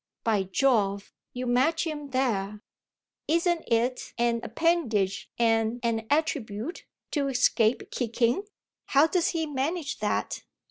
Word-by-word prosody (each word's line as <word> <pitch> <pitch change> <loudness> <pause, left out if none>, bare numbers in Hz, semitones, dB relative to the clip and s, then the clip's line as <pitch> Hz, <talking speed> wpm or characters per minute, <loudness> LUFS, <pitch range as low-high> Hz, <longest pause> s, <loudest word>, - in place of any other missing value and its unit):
"By 210 -4 +1
Jove, 200 -6 +1 0.2
you 250 0 -4
match 265 +8 +2
him 295 -3 -5
there! 210 -6 -1 0.6
Isn't 340 +1 +2
it 240 +2 0
an 235 0 +1
appendage 235 - 0
and 225 0 +2
an 225 -1 -1
attribute 290 - -1 0.2
to 285 -3 0
escape 245 -3 +2
kicking? 240 - 0 0.4
How 280 +2 +5
does 340 +1 +1
he 325 -1 -1
manage 295 +2 -2
that?" - - -2
250 Hz, 120 wpm, -27 LUFS, 225-310 Hz, 0.6 s, How